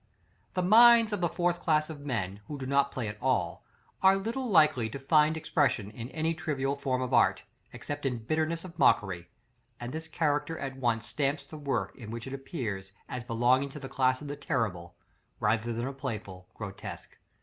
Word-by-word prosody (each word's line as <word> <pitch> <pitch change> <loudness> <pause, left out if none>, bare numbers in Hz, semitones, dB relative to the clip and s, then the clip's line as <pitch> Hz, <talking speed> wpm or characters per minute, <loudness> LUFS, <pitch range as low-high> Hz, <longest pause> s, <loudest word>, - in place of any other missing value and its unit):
4. 185 - +1
The - - 0
minds 230 +1 +7
of 205 - -1
the 175 - +2
fourth 175 0 0
class 155 -3 +2
of 155 -3 -8
men 105 -8 -3
who 145 - -5
do 135 - -5
not 140 +1 +2
play 125 -4 -3
at 105 +2 -7
all, 120 -10 0 0.4
are 190 0 +6
little 230 +6 -3
likely 155 - +4
to 125 - -6
find 150 +3 +3
expression 135 -10 +1
in 115 +2 -7
any 160 +2 -1
trivial 140 -4 -1
form 130 -2 -1
of 130 0 -4
art, 120 - +4 0.3
except 145 0 -6
in 125 -2 -1
bitterness 155 +8 -1
of 175 -2 -11
mockery; 90 -4 +3 0.5
and 120 +2 -6
this 160 +1 -5
character 160 0 0
at 135 -2 -5
once 120 -3 0
stamps 140 0 -1
the 140 +3 -11
work 145 -3 -2
in 115 -4 -9
which 115 +1 -5
it 135 - -6
appears, 115 - -5
as 125 -1 -5
belonging 125 +4 +2
to 150 - -8
the 135 - -7
class 130 +1 +1
of 145 0 -6
terrible, 95 -11 -2 0.4
rather 115 +1 +1
than 115 +1 -2
of 135 0 -5
playful, 105 -8 -5
grotesque. 100 -2 -8
135 Hz, 195 wpm, -29 LUFS, 115-155 Hz, 0.5 s, minds